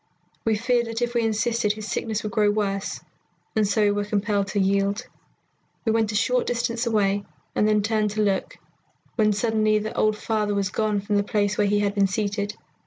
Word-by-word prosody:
We 220 -1 +3
feared 235 +1 +1
that 230 +1 -2
if 240 0 -1
we 235 - +2
insisted, 225 -1 +1
his 215 0 -7
sickness 220 -1 -2
would 215 - -3
grow 210 0 +3
worse, 200 -2 -1 0.5
and 215 -2 +3
so 210 +2 +2
we 205 - +4
were 205 0 0
compelled 205 -1 0
to 200 +1 -1
yield. 200 +4 +1 0.8
We 225 - +3
went 220 -1 +1
a - - -4
short 250 +4 +1
distance 240 0 -1
away 205 -3 +1 0.3
and 210 - +2
then 210 -1 +3
turned 215 0 +1
to 215 - +3
look, 195 -2 -1 0.6
when 215 -2 +3
suddenly 215 0 +2
the 215 +1 -4
old 215 0 +2
father 210 -1 -1
was 200 -1 0
gone 215 -2 0
from 205 +1 0
the 205 - +2
place 205 0 0
where 205 -1 +2
he 205 +1 +2
had 200 -1 0
been 200 -1 +3
seated. 205 +1 -2
210 Hz, 205 wpm, -24 LUFS, 205-220 Hz, 0.8 s, we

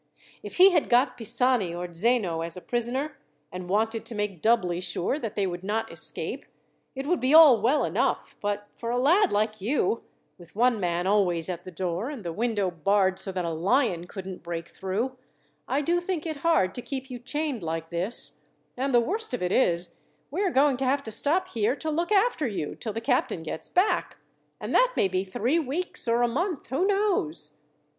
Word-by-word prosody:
If - - -8
he 380 +2 +8
had 330 -4 +1
got 250 0 +3
Pisani 235 -5 0
or 175 0 -6
Zeno 185 -3 +1
as 165 +1 -5
a - - -7
prisoner, 245 +7 -2 0.3
and 180 0 -7
wanted 220 +3 0
to 230 - -5
make 205 -5 -3
doubly 180 -7 +2
sure 185 - -1
that 225 -7 -5
they 200 - +1
would 175 -1 -4
not 215 +3 -2
escape, - - -1 0.5
it 270 +1 -4
would 345 +3 +1
be 260 +4 +3
all 290 -9 +9
well 265 +7 +3
enough, - - -1
but 205 0 -2
for 230 - -6
a 245 - 0
lad 345 +10 +4
like 215 0 0
you, 230 0 0 0.4
with 175 +1 -16
one 240 0 +3
man 175 -1 -1
always 185 -4 +2
at 175 -1 -5
the - - -7
door, 180 - -3
and 265 -10 -8
the 170 - -3
window 210 -3 0
barred 190 +3 +1
so 190 0 -4
that 180 -2 -3
a 165 - -1
lion 180 - +1
couldn't 190 -1 -7
break 170 -1 -5
through, 220 +8 -3 0.5
I 270 +3 +1
do 345 +4 +2
think 350 -3 -3
it 315 -2 -3
hard 300 - +2
to 245 - -5
keep 265 +2 -6
you 245 - -6
chained 290 -1 -3
like 165 0 -4
this; 180 +7 -1 0.3
and 265 0 0
the - - +7
worst 390 - -2
of 225 - -5
it 180 - 0
is, 175 -8 +1 0.3
we 345 +7 -2
are 395 - +2
going 275 -3 +3
to 265 - -1
have 280 +2 +1
to 220 - -6
stop 335 - +2
here 230 +3 0
to 315 +1 -4
look 340 +5 -1
after 400 - +3
you 195 -9 -3
till 220 - -5
the 225 - -4
captain 175 -6 0
gets 160 0 -5
back, 375 +4 +1 0.4
and - - -5
that - - +4
may - - +4
be 185 0 -1
three 235 - 0
weeks 315 0 -2
or 235 +1 +3
a - - +4
month, 325 +6 -2
who 280 +10 +1
knows!" 370 - 0
230 Hz, 205 wpm, -26 LUFS, 185-280 Hz, 0.5 s, all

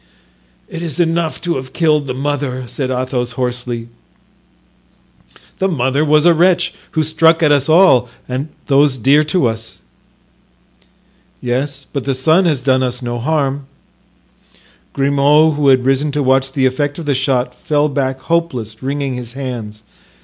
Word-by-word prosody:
"It 165 - -7
is 165 -3 -5
enough 165 -1 0
to 175 -4 -1
have 130 0 -8
killed 150 -4 +1
the 130 - -3
mother," 135 -2 -3
said 130 +2 -4
Athos, 125 -1 -2
hoarsely. 125 -2 -4 1.7
"The 190 - +2
mother 140 -4 0
was 150 +1 +3
a 175 - +6
wretch, 175 +1 +2 0.2
who 155 - +1
struck 160 +2 +3
at 150 - +4
us 140 0 +2
all 155 -8 +5 0.2
and 130 +2 -3
at - - -31
those 140 -1 +3
dear 140 +6 +4
to 155 -1 +1
us." 115 -1 -4 1.6
"Yes, 135 +3 -3
but 140 -3 -3
the 135 -1 0
son 160 +8 +3
has 150 -7 0
done 130 -1 +2
us 125 0 -2
no 120 0 -3
harm." 140 0 -1 1.3
Grimaud, 140 +3 +3
who 145 -1 0
had 130 -2 +4
risen 135 +2 +1
to 145 -1 0
watch 135 0 +2
the 135 -1 0
effect 145 +3 -1
of 170 - -7
the 145 - +1
shot, 130 -1 0
fell 150 0 0
back 135 -2 -2
hopeless, 130 -11 -2
wringing 140 0 -2
his 120 -1 -6
hands. 120 -6 -6
140 Hz, 155 wpm, -16 LUFS, 130-155 Hz, 1.7 s, a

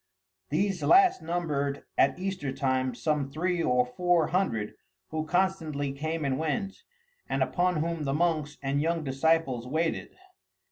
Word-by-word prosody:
These 195 +5 0
last 375 0 +5
numbered, 150 -4 -2
at - - +3
Easter 180 -7 -3
time, 130 -2 0
some 150 0 -1
three 175 +4 -1
or 125 -4 +3
four 175 +5 +1
hundred, 120 - 0 0.4
who 155 0 -3
constantly 160 -6 0
came 155 +3 -3
and 135 0 0
went, 160 +5 -2 0.5
and - - +1
upon 180 -3 +1
whom 165 -2 -2
the 135 - 0
monks 155 -3 0
and 140 +1 0
young 165 +1 0
disciples 135 -3 +1
waited. 160 +4 -2
155 Hz, 140 wpm, -28 LUFS, 140-175 Hz, 0.5 s, last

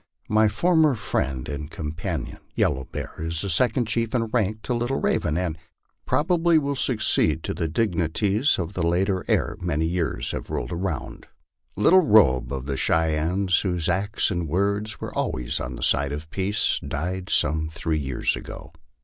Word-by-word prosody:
My 110 0 +4
former 155 +5 +3
friend 65 - -2
and 75 0 -5
companion, 80 0 -4 0.2
Yellow 65 0 +1
Bear, - - -6
is 80 +1 -2
the 100 - -1
second 125 - +2
chief 115 +1 -1
in 115 -2 +1
rank 110 -1 -1
to 125 - -1
Little 120 +3 -1
Raven, 75 +1 0
and 85 -3 -2 0.5
probably 170 +1 +3
will 140 -2 0
succeed 110 - +1
to - - -2
the 85 - -2
dignities 100 - +1
of 90 +1 -3
the 90 - -3
latter 90 +3 +1
ere - - +1
many 80 -3 0
years 85 -1 -1
have - - -5
rolled - - -3
around. 85 -3 -4 0.5
Little 165 - +6
Robe, 90 - +4
of 65 -2 -4
the 70 -1 -2
Cheyennes, 80 +5 +1
whose 90 -4 -1
acts 100 +5 0
and 85 -3 -2
words 100 +5 -1
were - - -6
always - - -2
on 65 -1 -5
the - - -6
side 70 0 +2
of 75 +2 -7
peace, 100 +2 0
died 90 +5 -4
some 80 +2 +1
three 80 -1 -2
years 65 -3 0
ago. 85 -1 -9
90 Hz, 165 wpm, -24 LUFS, 80-110 Hz, 0.5 s, Little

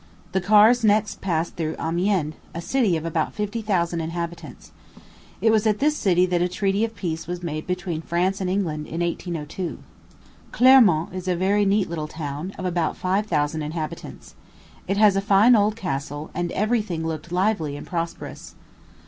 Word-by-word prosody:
The 190 - 0
cars 215 +5 +5
next 210 0 +2
passed 165 -3 -1
through 160 -2 -2
Amiens, 170 -1 0 0.2
a - - -3
city 195 -1 +1
of 160 - -6
about 165 -1 -1
fifty 210 +2 -3
thousand 175 -5 0
inhabitants. 170 0 -6 0.7
It 225 - +4
was 220 0 +3
at 210 -1 +2
this 300 +4 +2
city 180 -8 +3
that 180 -1 0
a 175 - +2
treaty 195 +3 0
of 225 0 -2
peace 165 -5 -4
was 175 0 -5
made 155 -2 -4
between 180 -3 -3
France 180 +4 -1
and 185 - -1
England, 165 -6 -2
in 165 +2 -4
1802. 170 0 -3 0.7
Clermont 230 -12 +5
is 185 0 -6
a 180 - +1
very 200 +3 +2
neat 200 0 +2
little 155 -2 -4
town, 150 +3 -5
of 185 - -5
about 175 -2 -1
five 195 +3 0
thousand 150 -2 0
inhabitants. 155 +1 -6 0.5
It 195 +2 0
has 210 -2 +5
a 195 - +1
fine 205 +5 +5
old 210 0 +2
castle, 145 -6 -4
and 175 -1 -2
every 215 +3 +1
thing 170 -6 -4
looked 160 +1 -5
lively 180 -6 0
and - - -9
prosperous. 170 -1 -5
180 Hz, 175 wpm, -23 LUFS, 165-205 Hz, 0.7 s, cars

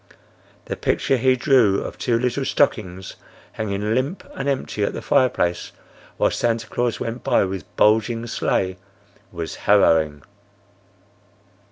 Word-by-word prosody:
The - - -4
picture 135 - 0
he 130 +1 +3
drew 125 -7 +3
of - - -7
two 120 -2 +1
little 125 +3 -1
stockings 95 -10 -1 0.3
hanging 105 0 -2
limp 135 +10 -1
and 135 +1 -3
empty 130 -6 -2
at - - -1
the - - -5
fireplace 90 -9 +1 0.4
while - - +2
Santa 115 -1 -1
Claus 120 -2 -2
went 115 +1 -5
by - - +3
with 95 -3 -5
bulging 110 +2 +2
sleigh 95 -5 -1 0.5
was 85 -1 -5 0.2
harrowing. 80 -8 +4
115 Hz, 130 wpm, -22 LUFS, 95-125 Hz, 0.5 s, harrowing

